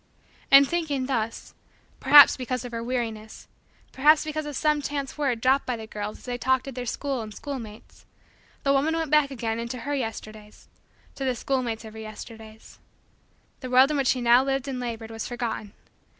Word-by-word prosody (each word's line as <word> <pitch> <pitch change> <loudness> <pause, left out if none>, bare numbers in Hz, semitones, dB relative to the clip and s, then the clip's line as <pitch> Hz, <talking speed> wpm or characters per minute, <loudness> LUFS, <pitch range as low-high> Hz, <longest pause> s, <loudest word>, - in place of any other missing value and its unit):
And 275 0 +8
thinking 305 -6 -1
thus, 230 -4 -3 0.5
perhaps 285 +1 +8
because 255 -1 -4
of 245 - -7
her 230 -1 -4
weariness, 225 -3 -5 0.4
perhaps 300 +3 +4
because 310 0 -4
of 295 - -6
some 300 0 +1
chance 280 -1 -4
word 270 -6 -1
dropped 265 +3 +2
by 250 - -1
the 220 - -8
girls 210 -1 -6
as - - -17
they 245 -1 -4
talked 260 +1 +1
of 270 - -6
their 245 0 -6
school 270 +1 -3
and 215 -1 -8
schoolmates, 230 -3 -9 0.6
the 275 - +3
woman 295 +4 +1
went 325 -3 -2
back 300 -2 +4
again 230 -4 -3
into 235 +1 -5
her 290 +4 -3
Yesterdays 215 -4 -6 0.5
to 275 - -6
the 260 -1 0
schoolmates 235 -3 -2
of 220 - -10
her 220 - -9
Yesterdays. 220 0 -11 0.8
The 255 - -7
world 260 +3 +5
in 300 - 0
which 270 -2 0
she 255 - +1
now 240 +2 +5
lived 270 0 -2
and 260 -2 -4
labored 230 -2 -5
was 225 0 -5
forgotten. 235 -4 -4
255 Hz, 190 wpm, -25 LUFS, 225-275 Hz, 0.8 s, And